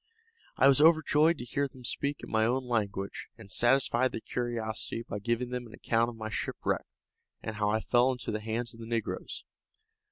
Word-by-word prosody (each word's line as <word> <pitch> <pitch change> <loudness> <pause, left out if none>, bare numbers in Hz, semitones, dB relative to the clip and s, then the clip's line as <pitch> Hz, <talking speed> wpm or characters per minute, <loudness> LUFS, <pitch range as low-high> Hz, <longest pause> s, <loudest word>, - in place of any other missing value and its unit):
I 135 - +6
was 140 +1 +6
overjoyed 160 0 +5
to 120 - -6
hear 140 +3 -1
them 130 -1 -15
speak 140 +4 -2
in - - -8
my 110 0 +3
own 125 +3 +1
language, 100 -5 -2
and 105 -4 -13
satisfied 130 +2 +3
their - - -4
curiosity 115 -2 -3
by 105 - -4
giving 120 +3 -1
them 125 -1 -4
an 110 - -14
account 115 +1 +1
of 120 - -9
my 110 -1 -5
shipwreck, - - -2 0.6
and 110 -1 -5
how 105 -1 +1
I 110 +1 +1
fell 125 +3 +3
into 125 -3 -4
the 105 0 -3
hands 115 +2 -3
of 115 - -14
the 115 - -8
negroes. 115 -2 -3
120 Hz, 195 wpm, -30 LUFS, 110-130 Hz, 0.6 s, I